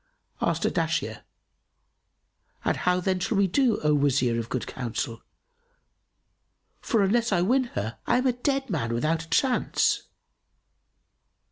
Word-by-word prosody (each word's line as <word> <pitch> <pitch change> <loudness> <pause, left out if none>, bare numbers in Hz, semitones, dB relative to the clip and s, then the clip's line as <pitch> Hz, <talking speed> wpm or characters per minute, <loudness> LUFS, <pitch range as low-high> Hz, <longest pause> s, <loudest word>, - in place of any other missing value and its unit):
Asked - - 0
Ardashir, - - -1 1.4
"And - - +2
how 180 0 +1
then 185 0 0
shall 200 +3 -1
we 200 - +4
do, 235 +4 +2
O 150 0 +3
Wazir 130 -5 +2
of 115 0 -5
good 130 - -2
counsel? 120 0 -4 1.6
For 225 -5 +1
unless 230 +4 +2
I 175 -3 +2
win 255 +7 +2
her 110 +2 -3
I - - +3
am 255 - 0
a 255 - +3
dead 270 +2 -1
man 115 -9 -1
without 155 +6 0
a - - -23
chance." 260 -2 +2
180 Hz, 135 wpm, -26 LUFS, -, 1.6 s, we